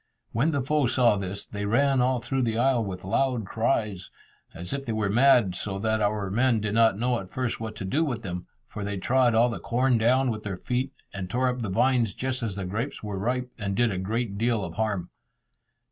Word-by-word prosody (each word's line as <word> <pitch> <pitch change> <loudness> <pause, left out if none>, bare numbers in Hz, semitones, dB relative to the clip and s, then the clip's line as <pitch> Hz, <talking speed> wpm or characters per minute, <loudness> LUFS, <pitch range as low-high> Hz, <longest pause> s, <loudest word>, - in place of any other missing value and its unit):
When 135 +8 +2
the 140 -4 0
foe 150 0 +2
saw 120 -3 +4
this, 100 0 -5
they 105 -1 -5
ran 135 +5 +3
all 125 0 +2
through 130 +3 -1
the 115 -2 0
isle 125 -1 +3
with 95 -3 -6
loud 120 +3 0
cries, 105 -3 -1 0.4
as 85 +2 -7
if 140 0 -3
they 115 - -3
were 105 -2 0
mad, 120 -4 +5
so 95 +2 -3
that 110 +1 0
our 100 -2 0
men 120 +2 +2
did 105 0 -2
not 115 -3 +4
know 120 +1 +1
at 95 - -9
first 125 +1 -2
what 110 -1 -5
to 105 -3 -5
do 145 +12 +1
with 120 -6 -3
them, 90 -2 -5 0.2
for 105 - -6
they 100 0 -3
trod 120 +4 +2
all 120 +2 +5
the 115 - -4
corn 125 0 +1
down 125 +3 +3
with 110 -1 -4
their 100 -3 -4
feet, 130 +5 -2 0.2
and 95 -2 -5
tore 125 +5 +1
up 125 0 -3
the 110 - -2
vines 115 +1 +2
just 130 0 -2
as 110 -5 -3
the 100 -1 -4
grapes 110 +10 -4
were 105 -2 -4
ripe, 125 +4 -1
and 100 -2 -2
did 120 0 +2
a 95 - -2
great 105 +1 -2
deal 115 -2 +1
of 85 - -7
harm. 100 -3 -2
115 Hz, 230 wpm, -26 LUFS, 100-125 Hz, 0.4 s, mad